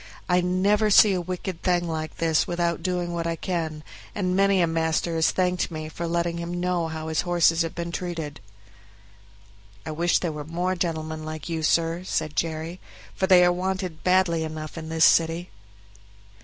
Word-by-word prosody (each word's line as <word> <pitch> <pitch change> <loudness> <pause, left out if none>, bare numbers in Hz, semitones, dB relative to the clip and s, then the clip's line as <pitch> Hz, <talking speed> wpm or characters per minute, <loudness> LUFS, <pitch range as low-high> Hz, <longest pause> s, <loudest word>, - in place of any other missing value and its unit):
I 180 0 +3
never 200 +4 +2
see 205 0 +7
a 180 - -1
wicked 180 0 -5
thing 175 -1 +1
like 155 -2 -4
this 165 -2 +2
without 170 -1 -1
doing 175 -1 -2
what 170 -1 -2
I 165 - -1
can, 160 -3 -3 0.3
and 185 -3 0
many 195 0 +3
a 175 - +4
master 165 0 0
has 160 0 +3
thanked 180 -1 0
me 155 -1 -6
for 170 +2 -5
letting 170 0 -1
him 175 +1 -4
know 180 -2 0
how 160 0 -5
his 160 -1 0
horses 175 -1 +3
have 165 -1 -2
been 170 0 -4
used." 165 -5 -5 1.5
"I 155 - -4
wish 170 +3 +2
there 170 - -2
were 150 -1 -6
more 175 +4 -2
gentlemen 160 -3 -3
like 155 +2 -6
you, 165 -1 -2
sir," 165 +2 +1
said 155 -4 -2
Jerry, 165 +3 -2 0.3
"for 190 - 0
they 180 -2 +7
are 175 - +4
wanted 185 -2 -3
badly 180 -3 +3
enough 155 -1 -6
in 160 -1 -7
this 160 0 +4
city." 165 +2 +2
170 Hz, 185 wpm, -25 LUFS, 160-180 Hz, 1.5 s, see